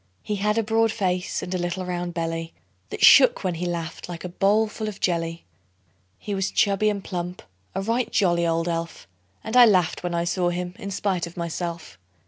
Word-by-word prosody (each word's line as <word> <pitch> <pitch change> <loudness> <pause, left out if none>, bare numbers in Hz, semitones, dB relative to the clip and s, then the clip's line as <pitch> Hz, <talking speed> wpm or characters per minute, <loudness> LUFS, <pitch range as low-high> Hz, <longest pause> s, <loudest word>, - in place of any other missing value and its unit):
He 210 - -2
had 210 +2 0
a 225 - +2
broad 225 +1 +2
face, 185 -4 -1
and 185 - -5
a 185 - -1
little 175 +1 -3
round 175 -1 -4
belly 165 0 -3 0.3
That - - +3
shook 260 -5 +7
when 185 -2 0
he 175 +2 -3
laughed, 170 0 -5
like 170 -1 -7
a 180 - -4
bowl 205 +4 +2
full 215 0 -5
of 205 -2 -6
jelly. 165 -1 -1 0.7
He 205 - -5
was 195 -1 -1
chubby 205 +1 +2
and 200 -2 -3
plump 180 0 -5 0.3
a 195 - -1
right 230 +4 -1
jolly 175 -4 +2
old 165 +1 0
elf; 165 -1 -4 0.4
And 220 +2 -4
I 250 -1 +9
laughed 185 -6 +2
when 175 -1 -3
I 170 - 0
saw 175 0 0
him 175 0 -4
in 200 - -5
spite 185 -3 -1
of 170 - -13
myself. 170 - -5
180 Hz, 205 wpm, -24 LUFS, 170-205 Hz, 0.7 s, I